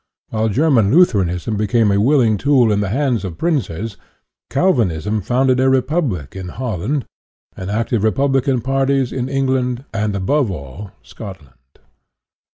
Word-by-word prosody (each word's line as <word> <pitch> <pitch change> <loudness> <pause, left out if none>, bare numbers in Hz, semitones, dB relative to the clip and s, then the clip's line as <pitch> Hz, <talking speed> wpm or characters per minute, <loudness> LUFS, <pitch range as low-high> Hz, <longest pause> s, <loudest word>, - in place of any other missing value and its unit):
While 110 0 0
Ger 150 +9 +2
man 110 -7 +4
Lutheranism 105 - +2
became 105 +1 +2
a 100 0 +2
willing 120 -4 +3
tool 130 -4 +3
in 105 - +1
the 100 -2 -1
hands 125 -1 0
of 90 -4 -6
princes, 115 - -2 0.5
Calvinism 110 - +1
founded 125 +5 +1
a 130 0 +3
republic 130 - -1
in 95 -1 -6
Holland, 120 - -3 0.5
and 95 +1 -6
active 110 +1 -1
republican 135 +2 +1
parties 135 0 0
in 130 0 -3
Eng 135 0 0
land, 130 -1 -1
and, 105 -2 -1
above 120 +7 +1
all, 80 +3 -7
Scotland. 95 - -11
115 Hz, 145 wpm, -18 LUFS, 100-135 Hz, 0.5 s, man